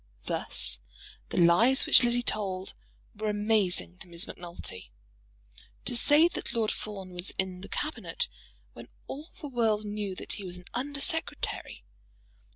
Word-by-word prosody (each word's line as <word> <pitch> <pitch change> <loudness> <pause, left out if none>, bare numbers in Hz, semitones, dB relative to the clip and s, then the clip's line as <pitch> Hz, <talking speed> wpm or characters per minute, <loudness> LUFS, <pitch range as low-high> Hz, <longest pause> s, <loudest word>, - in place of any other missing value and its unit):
Thus - - +1 0.5
the - - -4
lies 180 +10 +5
which - - +8
Lizzie 240 0 +2
told 190 -4 -2 0.4
were 215 +1 -2
amazing 205 - +2
to - - -11
Miss 170 0 +3
Macnulty. 170 - -8 1.0
To 245 - 0
say 295 +7 +6
that 345 - -6
Lord 225 -2 +1
Fawn 195 -3 -6
was 180 +1 -3
in 185 -1 -1
the - - -9
Cabinet, 400 +10 -2 0.5
when - - -11 0.2
all 300 +5 -7
the 300 - -6
world 225 -5 +1
knew 205 -2 -3
that - - -5
he 205 - -6
was 180 -1 -5
an 180 - -13
Under 280 +3 -2
Secretary! 325 - -1
210 Hz, 150 wpm, -29 LUFS, 180-245 Hz, 1.0 s, which